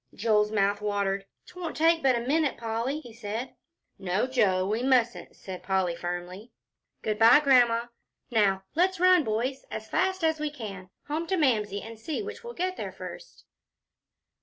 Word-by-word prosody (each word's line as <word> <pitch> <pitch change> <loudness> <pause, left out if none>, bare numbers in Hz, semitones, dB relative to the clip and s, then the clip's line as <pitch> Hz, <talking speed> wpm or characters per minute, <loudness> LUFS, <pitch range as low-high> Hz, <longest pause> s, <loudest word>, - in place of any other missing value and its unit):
Joel's 210 0 +2
mouth 205 -1 +1
watered. 200 -1 -1 0.2
"'Twon't 355 -3 -7
take 325 +1 +4
but 265 -2 +3
a 235 - -1
minute, 290 +3 +1
Polly," 230 +6 -2
he 240 -6 -12
said. 225 +2 -5 0.5
"No, 190 +3 0
Joe, 200 -8 +2
we 215 +3 -1
mustn't," 250 -2 +1
said 185 -2 -8
Polly, 190 -3 0
firmly. 175 +5 -6 0.5
"Good 215 -1 -1
by, 230 +5 +8
Grandma. 245 -5 +4 0.5
Now, 195 -4 +2
let's 365 +2 +2
run, 365 -2 +5
boys, 245 +4 -2
as 220 0 -6
fast 375 -1 0
as 320 -1 +2
we 305 0 -1
can, 200 -9 -8 0.2
home 315 +3 -2
to 380 - 0
Mamsie, 210 - +1
and 225 0 -10
see 310 - -3
which 440 +3 -8
will 475 0 -7
get 370 +1 -2
there - - -4
first." - - -10
230 Hz, 165 wpm, -27 LUFS, 205-305 Hz, 0.5 s, by